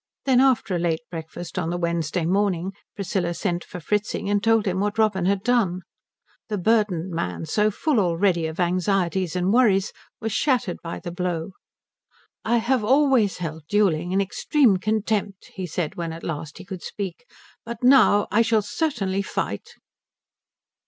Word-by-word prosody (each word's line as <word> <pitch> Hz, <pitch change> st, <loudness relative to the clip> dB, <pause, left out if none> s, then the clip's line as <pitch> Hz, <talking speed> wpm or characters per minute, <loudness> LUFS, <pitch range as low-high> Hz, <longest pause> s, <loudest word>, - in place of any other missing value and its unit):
Then, 260 Hz, -2 st, +4 dB
after 255 Hz, -8 st, +3 dB
a -, -, 0 dB
late 165 Hz, -1 st, 0 dB
breakfast 165 Hz, +2 st, -6 dB
on 165 Hz, -2 st, -2 dB
the 175 Hz, -, -2 dB
Wednesday 170 Hz, -1 st, -1 dB
morning, 190 Hz, 0 st, 0 dB, 0.2 s
Priscilla 180 Hz, -3 st, -2 dB
sent 175 Hz, -2 st, -2 dB
for 180 Hz, -, -9 dB
Fritzing 210 Hz, +3 st, -1 dB
and 205 Hz, 0 st, +1 dB
told 225 Hz, -1 st, +3 dB
him 185 Hz, -1 st, 0 dB
what 205 Hz, +2 st, -1 dB
Robin 210 Hz, -5 st, +2 dB
had 195 Hz, +1 st, +1 dB
done. 215 Hz, -8 st, +1 dB, 0.7 s
The 210 Hz, -, -1 dB
burdened 190 Hz, -3 st, +1 dB
man, 165 Hz, -1 st, -3 dB
so 210 Hz, +7 st, +2 dB
full 265 Hz, -, 0 dB
already 175 Hz, -2 st, +1 dB
of 160 Hz, +2 st, -7 dB
anxieties 180 Hz, 0 st, 0 dB
and 180 Hz, +3 st, +1 dB
worries, 210 Hz, -6 st, +3 dB, 0.3 s
was 225 Hz, -1 st, -3 dB
shattered 245 Hz, -, +1 dB
by 165 Hz, -, -6 dB
the 175 Hz, -, -6 dB
blow. 175 Hz, 0 st, -3 dB, 0.9 s
"I 235 Hz, +2 st, +2 dB
have 235 Hz, +1 st, +1 dB
always 260 Hz, -4 st, +3 dB
held 160 Hz, -3 st, -6 dB
duelling 180 Hz, -5 st, +2 dB
in 190 Hz, -, +2 dB
extreme 210 Hz, +3 st, +2 dB
contempt," 210 Hz, -1 st, -2 dB
he 185 Hz, -1 st, -5 dB
said 165 Hz, -1 st, -3 dB
when 170 Hz, -1 st, -4 dB
at 165 Hz, -, -9 dB
last 150 Hz, -1 st, -5 dB
he -, -, -10 dB
could 185 Hz, -2 st, -7 dB
speak, 200 Hz, +3 st, -6 dB, 0.4 s
"but 235 Hz, 0 st, -7 dB
now 250 Hz, -5 st, +6 dB
I 215 Hz, -, +4 dB
shall 225 Hz, -2 st, +2 dB
certainly 205 Hz, -7 st, -1 dB
fight." -, -, -4 dB
195 Hz, 165 wpm, -24 LUFS, 175-215 Hz, 0.9 s, now